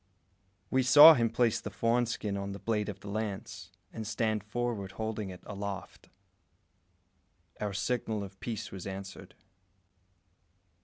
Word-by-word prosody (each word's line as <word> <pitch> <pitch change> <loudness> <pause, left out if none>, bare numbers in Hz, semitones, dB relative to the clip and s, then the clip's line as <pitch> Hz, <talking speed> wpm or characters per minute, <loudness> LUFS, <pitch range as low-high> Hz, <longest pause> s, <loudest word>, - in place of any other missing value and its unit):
We 130 - +3
saw 145 +5 +10
him 115 -5 +1
place 115 0 +1
the - - -5
fawn 115 +4 +1
skin 105 -3 -3
on 100 0 -4
the 100 - -8
blade 105 -2 -1
of 100 -2 -7
the 100 - -10
lance, 105 -1 -5 0.2
and 110 -2 -5
stand 110 -2 -1
forward 110 -3 -3
holding 110 -1 -4
it 90 -1 -10
aloft. 100 -1 -7 1.5
Our 105 -1 -2
signal 110 0 -1
of 95 -1 -11
peace 115 -4 -5
was 95 -1 -7
answered. 95 0 -8
105 Hz, 140 wpm, -30 LUFS, 100-115 Hz, 1.5 s, saw